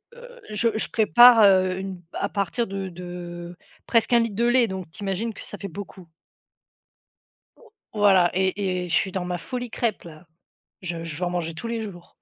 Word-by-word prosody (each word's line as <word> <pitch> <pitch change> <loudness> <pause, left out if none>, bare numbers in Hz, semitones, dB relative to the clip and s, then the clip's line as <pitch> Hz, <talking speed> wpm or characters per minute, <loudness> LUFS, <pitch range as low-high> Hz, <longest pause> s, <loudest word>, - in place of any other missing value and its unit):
heu, - - -13
je 215 +2 +1
je 220 - -1
prépare, 240 +1 +7
heu, 185 -2 +4
une 190 -1 -6
à 200 - -2
partir 205 +4 -1
de 195 -2 -5
de 175 0 -8 0.3
presque 230 0 +2
1 240 - +6
litre 225 -4 -2
de 235 - +1
lait, 240 0 +4
donc 190 -3 -6
tu 205 +5 -10
imagines 200 +3 -2
que - - -9
ça - - -8
fait 200 - -5
beaucoup. 185 -1 -10 1.8
Voilà 195 -4 +4
et 190 -1 0
et - - -5
je - - -3
suis 190 - +1
dans 185 -1 -3
ma 180 0 -3
folie 245 +4 -5
crêpe, 230 -5 -2
là! 165 0 -13 0.5
Je 170 -2 -5
je 160 -3 -6
veux 180 - -2
en 175 - -1
manger 175 -2 -3
tous 165 - -7
les 230 -1 -3
jours. 180 -5 -10
190 Hz, 195 wpm, -24 LUFS, 180-225 Hz, 1.8 s, prépare